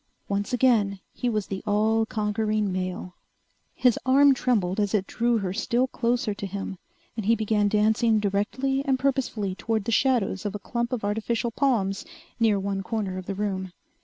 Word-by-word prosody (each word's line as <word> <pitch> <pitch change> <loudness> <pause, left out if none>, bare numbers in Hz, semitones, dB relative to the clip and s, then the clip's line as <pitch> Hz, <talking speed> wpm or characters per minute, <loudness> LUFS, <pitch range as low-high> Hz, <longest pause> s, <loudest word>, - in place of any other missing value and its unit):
Once 200 0 -2
again 225 -6 +2
he 245 - -1
was 215 -3 -1
the 190 -1 -5
all 220 +2 +2
conquering 215 -1 0
male. 185 -1 -4 0.6
His 250 -3 +3
arm 275 +2 +6
trembled 215 -8 0
as 205 0 +1
it 195 -2 +1
drew 235 +2 +1
her 190 -4 -2
still 235 +4 +1
closer 240 -3 -1
to 200 0 -5
him 195 -1 -5 0.4
and 220 -3 -4
he 230 - +5
began 215 -2 +1
dancing 220 +2 +3
directly 220 +7 0
and 270 -2 +1
purposefully 255 -7 -1
toward 220 +1 -2
the 230 - -1
shadows 230 -6 +1
of 205 -1 -3
a - - -1
clump 235 +4 -3
of 240 -5 -2
artificial 225 +3 -1
palms 215 -7 0 0.4
near 220 -3 +3
one 195 0 -2
corner 195 -2 -3
of 185 - -10
the 195 - -3
room. 190 -2 -3
215 Hz, 175 wpm, -26 LUFS, 200-235 Hz, 0.6 s, arm